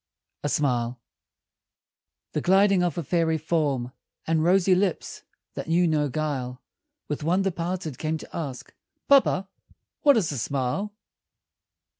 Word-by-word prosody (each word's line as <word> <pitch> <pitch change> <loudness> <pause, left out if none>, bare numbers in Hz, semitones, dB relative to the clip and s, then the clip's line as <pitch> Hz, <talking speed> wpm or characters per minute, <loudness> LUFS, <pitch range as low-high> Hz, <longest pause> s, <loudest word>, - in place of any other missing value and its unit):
A 145 - 0
SMILE 125 -4 0 1.3
The 150 - -2
gliding 195 +2 +4
of 175 0 0
a 170 - -1
fairy 165 0 +1
form 145 -6 -1 0.3
And 160 -1 +1
rosy 185 +2 +4
lips 185 -1 -1 0.3
that - - -6
knew 170 +2 +3
no 150 -2 +1
guile, 130 -3 -3 0.5
With 150 0 -4
wonder 190 +4 +2
parted, 170 -4 -4
came 155 0 -1
to - - -11
ask, 135 -5 -6 0.3
"Papa, 260 -9 +4 0.5
what 285 -4 +6
is 185 -8 +1
a 140 - -3
smile?" 140 - -2
160 Hz, 130 wpm, -25 LUFS, 140-180 Hz, 1.3 s, what